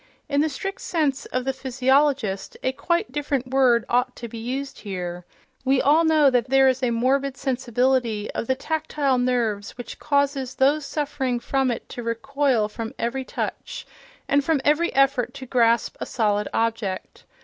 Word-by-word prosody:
In 285 0 +1
the 315 - +1
strict 390 +7 -5
sense 295 -5 -1
of 255 0 -2
the 270 - 0
physiologist, 265 -4 +1
a 260 - +1
quite 340 0 -1
different 275 -3 -2
word 250 -4 +4
ought 250 +1 +1
to 235 - -7
be 230 0 -8
used 265 +4 -4
here.... 180 -3 -5 0.4
We 265 0 +3
all 300 +5 +4
know 310 -4 +4
that 245 -1 +1
there 270 0 +5
is 260 0 +2
a 250 - +2
morbid 265 +3 +1
sensibility 245 -3 0
of 230 - -4
the 260 - +2
tactile 290 -2 -1
nerves 235 -5 -1
which 245 - -8
causes 280 -3 0
those 280 +2 +2
suffering 270 -4 -2
from 270 +2 0
it 235 - -4
to 245 - -6
recoil 245 0 0
from 225 +1 -6
every 255 +3 -2
touch, - - -5 0.4
and 285 0 +3
from 315 0 +1
every 305 +4 +3
effort 275 -1 +2
to 265 -1 -7
grasp 235 -2 +2
a - - -4
solid 210 -3 0
object. 225 -4 -2
260 Hz, 170 wpm, -24 LUFS, 235-280 Hz, 0.4 s, there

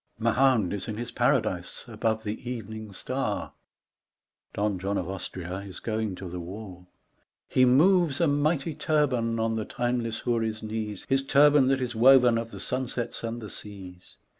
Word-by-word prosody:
Mahound 115 -3 +3
is 100 -2 -4
in 110 -2 -4
his 120 +1 -5
paradise - - 0
above 110 -1 -1
the 110 +4 -5
evening 110 -3 -6
star, 95 - -3 1.0
(Don 100 -2 -1
John 100 +2 -1
of 85 - -2
Austria 95 -1 -5
is 100 -2 -9
going 110 -3 -2
to 95 - -8
the 90 +1 -6
war.) 90 0 -9 0.6
He 130 - +4
moves 160 +3 +4
a 170 - +4
mighty 150 +1 +1
turban 130 -8 +1
on 115 0 0
the 110 - -1
timeless 120 -2 -2
houri's 115 -2 -1
knees, 110 -2 -4
His 135 0 +2
turban 145 0 +5
that 135 0 +2
is 125 -1 -2
woven 125 0 +6
of 115 0 -5
the - - -9
sunsets 125 -2 -3
and 115 0 -4
the 105 - -7
seas. 95 -3 -11
115 Hz, 165 wpm, -27 LUFS, 105-130 Hz, 1.0 s, woven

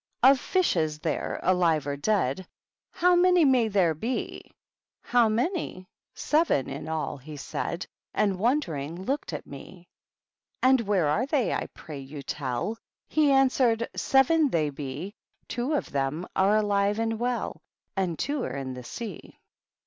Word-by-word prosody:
* - - -41
Of 265 +1 +7
fishes 165 - +1
there, 155 0 -2
alive 170 -5 +2
or 145 -1 -2
deady 185 -1 0 0.4
How 360 +1 +3
many 355 -2 +5
may 255 -4 +4
there 190 -6 +2
be 230 +12 -3
f - - -26 0.3
* - - -67
How 240 -2 +5
many 245 - -1 0.3
f - - -15
Seven 300 - +2
in 140 +2 -6
all^ 160 -3 -3
he 150 +2 -9
said. 170 +5 -4 0.3
And, 195 -3 +1
wondering, 180 - -1
looked 275 -5 -2
at 150 - -5
me. 170 +6 -11 0.8
^ - - +6
And 260 -1 +5
where 195 -7 +1
are 210 - +1
they, 280 -5 +1
I - - -2
pray 150 -4 -8
you 140 +1 -8
tell 130 - -2
f 225 - -7 0.3
He 300 -2 +3
answered, 255 -4 +3
'Seven 285 +3 +3
they 155 - 0
he; 145 +8 -5 0.3
Two 245 +6 -2
of - - -2
them 140 +5 -1
are 195 +3 +4
alive 205 -1 +1
and 225 0 -1
well, 245 0 -2 0.3
And 185 -4 -1
two 285 -2 -1
are - - -4
in 130 -1 -4
the 125 0 -8
sea. 205 - -8
200 Hz, 165 wpm, -27 LUFS, 155-255 Hz, 0.8 s, Of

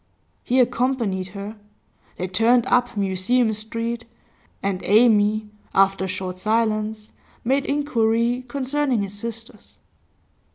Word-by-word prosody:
He 255 +2 +2
accompanied 235 -6 +1
her. 205 +2 -7 0.6
They 185 - -2
turned 230 +6 +3
up 245 -2 +1
Museum 205 +5 +1
Street, 230 +2 -4 0.6
and 195 -1 -1
Amy, 215 -1 +3 0.2
after 195 0 +3
a - - -3
short 185 0 -4
silence, 215 0 -1 0.3
made 270 +3 +1
inquiry 240 -4 +1
concerning 270 -2 0
his 200 0 -6
sisters. 230 +2 -8
225 Hz, 110 wpm, -23 LUFS, 200-245 Hz, 0.6 s, turned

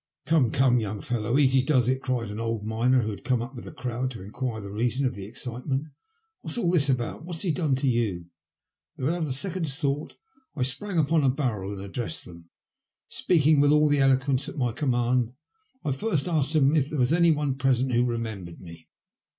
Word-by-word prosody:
" - - -59
Come, 155 -7 +3
come, 125 0 +3
young 105 -2 -4
fellow, 115 +2 -1
easy 135 -2 +5
does 130 -4 +2
it," 130 +1 +1
cried 120 -5 -2
an 105 - -6
old 115 -2 -2
miner, 120 +3 +2
who 110 - -2
had 100 - -9
come 125 -1 +1
up 120 +3 -6
with 120 - -9
the - - -8
crowd 125 0 -3
to 115 -7 -9
enquire 110 +3 -4
the 100 -1 -8
reason 120 +5 0
of 130 - 0
the 100 -3 -8
excitement. 130 +5 -4 0.3
*' 445 -1 -44
What's - - -3
all 180 -8 +1
this 145 -6 +3
about? 125 +3 -1
What 175 0 -6
has 165 - -2
he 180 - +1
done 155 -4 +1
to 135 +1 -1
you? 110 -8 0 0.4
" - - -55
Without 160 +4 -1
a - - -3
second's 160 0 +1
thought 145 -2 -2 0.4
I 135 - 0
sprang 180 +9 0
upon 160 0 +2
a 135 - +4
barrel 120 -8 -2
and 95 - -7
addressed 100 -3 -4
them. 85 -1 -13 0.6
Speaking 150 +2 +3
with 145 0 +5
all 150 0 +4
the 145 -1 +2
eloquence 135 +1 +2
at - - -10
my 125 -3 0
command, 120 -2 0 0.5
I 145 - +1
first 160 +2 0
asked 155 -3 +1
them 150 -1 +4
if 145 -2 +1
there 155 - -4
was 125 +3 +3
any 170 0 +4
one 150 -3 +1
present 130 -1 +1
who 120 0 +3
remembered 110 -8 -4
me. 85 -2 -13
130 Hz, 220 wpm, -26 LUFS, 115-150 Hz, 0.6 s, easy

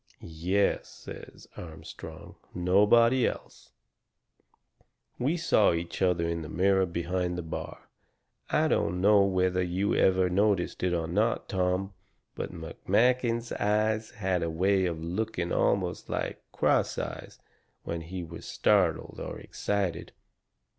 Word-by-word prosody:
"Yes," 90 +5 0
says - - -11
Armstrong, 80 -3 -10 0.2
"nobody 105 +7 +4
else. - - -7 1.5
We 145 +8 +1
saw 110 - +3
each 85 +2 -4
other 90 -3 +2
in 85 0 -2
the 75 - -7
mirror 95 +2 +2
behind 90 +1 -2
the 90 - -4
bar. 80 - -7 0.6
I - - +2
don't 90 - 0
know 100 +2 +5
whether 95 -1 +1
you 90 +3 0
ever 95 -1 +3
noticed 95 0 +1
it 90 -1 +1
or 85 -1 -1
not, 105 +8 0
Tom, 95 0 -1 0.4
but - - -5
McMakin's 115 +8 0
eyes 110 +1 0
had 95 -6 -1
a 85 - -1
way 95 +3 +2
of 80 -2 -4
looking 90 0 -2
almost - - 0
like - - -3
cross - - +1
eyes - - -6 0.5
when 85 0 -4
he 90 +2 -6
was 85 0 -9
startled 90 -6 +1
or - - -6
excited. 100 -4 -3
95 Hz, 125 wpm, -28 LUFS, 85-105 Hz, 1.5 s, know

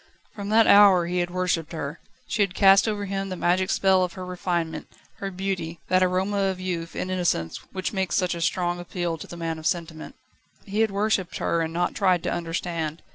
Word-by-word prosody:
From 200 -1 -6
that 225 +1 +5
hour 200 -4 +7
he 180 +1 -1
had 175 0 0
worshipped 175 -3 -1
her: 160 0 -5 0.3
she 210 - -1
had 195 -2 +1
cast 195 +1 +6
over 205 -2 -2
him 195 0 -3
the 185 - -3
magic 185 +2 +1
spell 190 -1 +3
of 180 -1 -3
her 185 +1 -7
refinement, 175 -2 -3 0.3
her 195 - -4
beauty, 180 -3 -4
that 185 0 +3
aroma 185 +2 +1
of 190 -1 -1
youth 175 -3 -4
and 185 - -3
innocence 175 - 0
which 185 +2 -3
makes 190 -2 -1
such 180 -3 +1
a 170 - -5
strong 175 +1 0
appeal 175 -1 -3
to - - -8
the 175 - -9
man 165 -1 -3
of 155 - -2
sentiment. 165 -2 -4 0.5
He 205 +1 -3
had 225 0 +3
worshipped 200 -2 0
her 170 - 0
and 160 0 -2
not 175 +1 -1
tried 185 -4 +2
to - - -1
understand. 165 -2 -3
180 Hz, 210 wpm, -25 LUFS, 170-195 Hz, 0.5 s, hour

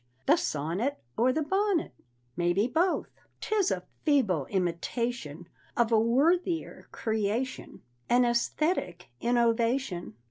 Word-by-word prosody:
the - - +6
sonnet 175 - -2 0.2
Or 250 +3 +3
the 310 +4 0
bonnet? 385 - 0 0.4
Maybe 175 +4 +2
both. 340 +8 0 0.3
"'Tis 420 -3 +1
a - - -2 0.2
feeble 215 - +2
imitation 175 - -2 0.3
Of 235 -1 +2
a 225 - +5
worthier 325 +9 +1
creation; 220 +3 -2 0.3
An 245 +1 +5
æsthetic 235 - 0 0.2
innovation!" 235 - +1
235 Hz, 105 wpm, -29 LUFS, 190-285 Hz, 0.4 s, the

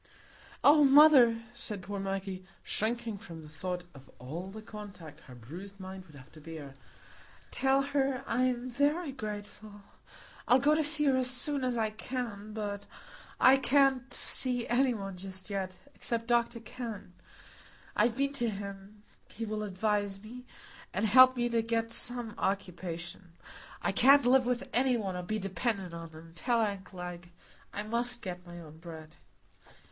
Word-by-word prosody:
"Oh, 295 +1 +7
mother," 270 -5 +7
said 210 -5 -3
poor 200 +2 -5
Maggie, 195 -1 -4 0.2
shrinking 225 -1 -1
from 165 -6 -10
the 150 - -12
thought 180 +4 -4
of 135 -1 -15
all 155 +9 -6
the 215 +2 -9
contact 190 -9 -10
her 130 - -11
bruised 180 - -10
mind 190 0 -8
would 155 - -16
have 135 0 -14
to 155 - -14
bear, 150 -3 -8 0.8
"tell 270 0 +2
her 275 -2 0
I'm 250 0 0
very 290 +5 +1
grateful; 210 -3 -8 0.6
I'll 250 - +7
go 285 +3 +4
to 310 0 +2
see 300 0 +2
her 275 -3 +4
as 255 -1 +1
soon 265 +2 0
as 250 -2 0
I 220 -1 0
can; 215 -2 -5
but 205 -2 -4 0.5
I 265 +1 +7
can't 270 -1 +3
see 245 -2 0
any 250 0 +3
one 195 -3 -6
just 190 +1 -8
yet, 190 -2 -3 0.2
except 230 -2 -3
Dr 235 -1 +1
Kenn. 230 -6 -7 0.8
I've 235 0 +2
been 275 +1 +1
to 240 -4 0
him,—he 200 +2 -8
will 215 0 -3
advise 205 0 -1
me, 240 +5 -11 0.5
and 200 +4 +1
help 255 +4 +7
me 240 0 +1
to 230 -1 +2
get 230 0 -1
some 240 -3 +1
occupation. 180 -2 -4 0.5
I - - +2
can't 275 0 +6
live 255 0 +5
with 250 -1 -1
any 250 0 +3
one, 195 -4 -3
or 180 - -3
be 215 +5 -2
dependent 195 -1 -2
on 165 0 -7
them, 160 +1 -13
tell 235 +7 0
aunt 200 -3 -1
Glegg; 175 -2 -8 0.4
I 205 - -4
must 240 +2 -1
get 180 -2 -6
my 175 0 -9
own 160 -1 -12
bread. 160 -2 -10
215 Hz, 160 wpm, -31 LUFS, 185-245 Hz, 0.8 s, Oh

